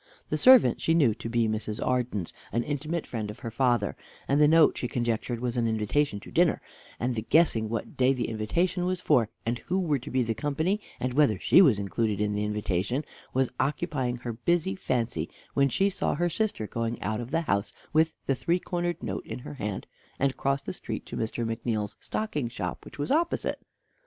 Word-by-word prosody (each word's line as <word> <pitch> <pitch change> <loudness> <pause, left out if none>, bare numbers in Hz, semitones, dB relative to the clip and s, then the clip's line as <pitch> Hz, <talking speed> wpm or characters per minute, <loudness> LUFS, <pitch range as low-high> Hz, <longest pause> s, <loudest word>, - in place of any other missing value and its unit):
The 155 - 0
servant 255 - +7
she 165 - +2
knew 140 -9 +4
to 115 +1 -6
be 115 -1 +2
Mrs. 110 0 -3
Arden's, 120 -8 -1 0.2
an 120 - 0
intimate 150 +4 -2
friend 110 -3 -4
of 105 - -7
her 115 - -5
father, 120 -3 +1 0.3
and 140 +2 +3
the 150 - +7
note 160 0 +6
she 125 - -2
conjectured 120 0 -1
was 125 0 -2
an 115 -1 +2
invitation 110 +2 0
to - - -12
dinner, - - +3 0.4
and 125 +1 0
the 110 - -2
guessing 115 -4 +3
what 115 0 -4
day 130 0 +4
the 130 -3 -1
invitation 170 - 0
was 185 -1 -1
for, 120 -11 +3 0.2
and 120 +1 -1
who 185 +2 -1
were 155 -7 +1
to 125 - -8
be 130 -1 +1
the 115 -1 -1
company, 155 - -1 0.2
and 125 0 -1
whether 140 -7 +4
she 185 - +6
was 135 - +6
included 105 +1 -1
in 105 0 +1
the 105 0 -1
invitation, 105 - -1 0.3
was 130 -1 +1
occupying 135 -3 0
her 120 -1 -5
busy 150 - +1
fancy, 115 -8 -1 0.2
when 140 0 +3
she 195 +9 +2
saw 200 - -1
her 175 +3 +1
sister 200 - -1
going 115 +2 -3
out 110 +4 -1
of 120 - -7
the 165 +4 +1
house 100 -10 0 0.2
with 160 +1 +3
the 135 - +2
three 170 +6 +1
cornered 175 -1 -3
note - - -4
in - - -5
her 145 +4 -8
hand, 105 -8 -4 0.3
and 135 -1 +1
cross 135 +1 0
the - - -4
street - - -5
to - - -7
Mr. 115 +1 -2
McNeal's 115 -2 -2
stocking 150 - -2
shop, 90 -5 -5
which 140 - -11
was 145 - -2
opposite. 335 +4 +1
125 Hz, 205 wpm, -28 LUFS, 110-150 Hz, 0.4 s, servant